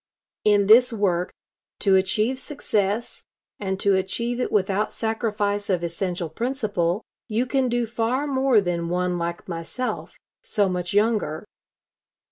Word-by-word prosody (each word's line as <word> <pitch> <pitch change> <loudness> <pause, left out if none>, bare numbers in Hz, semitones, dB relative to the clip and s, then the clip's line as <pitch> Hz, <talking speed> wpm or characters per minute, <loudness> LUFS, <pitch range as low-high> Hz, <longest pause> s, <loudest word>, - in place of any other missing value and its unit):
In 205 -1 +4
this 240 +5 +7
work, 185 -5 0 0.5
to 195 -2 +4
achieve 215 +7 +1
success, 220 -6 -2 0.4
and 190 -1 -2
to 200 - +3
achieve 235 +6 -1
it 250 - -1
without 200 0 +1
sacrifice 210 -2 -1
of 180 -3 +1
essential 175 0 -2
principle, 215 - -1 0.2
you 230 +2 0
can 260 0 +1
do 240 0 +1
far 235 +4 -1
more 265 -5 +3
than 170 -2 -2
one 180 0 0
like 170 0 -4
myself, 175 +9 -4 0.3
so 215 - +1
much 180 0 -2
younger. 210 -6 +1
205 Hz, 130 wpm, -24 LUFS, 180-235 Hz, 0.5 s, this